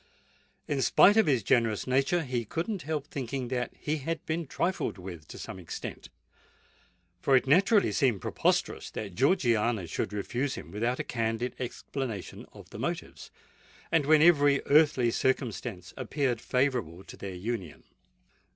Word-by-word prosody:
In 140 -2 0
spite 200 - +6
of 220 -4 +4
his 130 -7 +2
generous 115 -1 +2
nature, 135 +7 +2
he 125 -4 -2
could 165 +10 -3
not 210 -5 -3
help 150 -1 -3
thinking 130 -3 -4
that 125 -1 -2
he 150 +1 -2
had 155 +2 -4
been 165 0 -2
trifled 180 - -1
with 90 -4 -9
to - - -10
some 95 - -7
extent; 85 -3 -7 1.1
for 135 - +4
it 130 - +4
naturally 195 - +4
seemed 125 -9 +2
preposterous - - 0
that 100 -4 -6
Georgiana 120 - +2
should 80 - -3
refuse 120 +7 -2
him - - -9
without 115 +5 -1
a - - -1
candid 115 +1 -2
explanation 125 -3 -5
of - - -14
the - - -8
motives, - - -4 0.6
and 150 -4 +2
when 155 0 +6
every 145 -4 +5
earthly 145 -5 +4
circumstance 115 -8 -2
appeared 130 -2 -1
favourable 125 - -1
to - - -11
their 95 -2 -7
union. 95 -3 -5
130 Hz, 150 wpm, -29 LUFS, 110-145 Hz, 1.1 s, spite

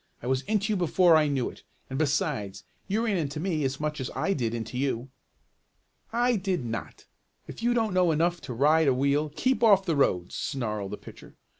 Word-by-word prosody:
"I - - -6
was 130 +1 +1
into 215 0 0
you - - 0
before 175 0 +4
I 155 -1 +4
knew 135 -4 0
it. - - -16 0.3
And 130 +1 -4
besides, 135 -10 -1 0.2
you 215 +4 0
ran 210 -4 +1
into 150 -2 -3
me 160 -3 -1
as 135 0 -2
much 150 -1 -2
as 130 - -3
I 160 +9 0
did 120 -6 -2
into 115 +1 -5
you." 130 -1 -2 1.0
"I 240 0 +2
did 185 -8 -2
not. 115 0 -6 0.4
If - - -9
you 240 +1 +2
don't 220 -4 +1
know 180 -2 +3
enough 170 +2 +1
to 125 - -5
ride 150 +5 +4
a 135 - +4
wheel, 140 +3 +1
keep 260 +5 +1
off 200 -4 +6
the 165 -4 0
roads!" 90 -11 +1
snarled 105 -7 -3
the - - -4
pitcher. - - -14
150 Hz, 205 wpm, -27 LUFS, 130-185 Hz, 1.0 s, off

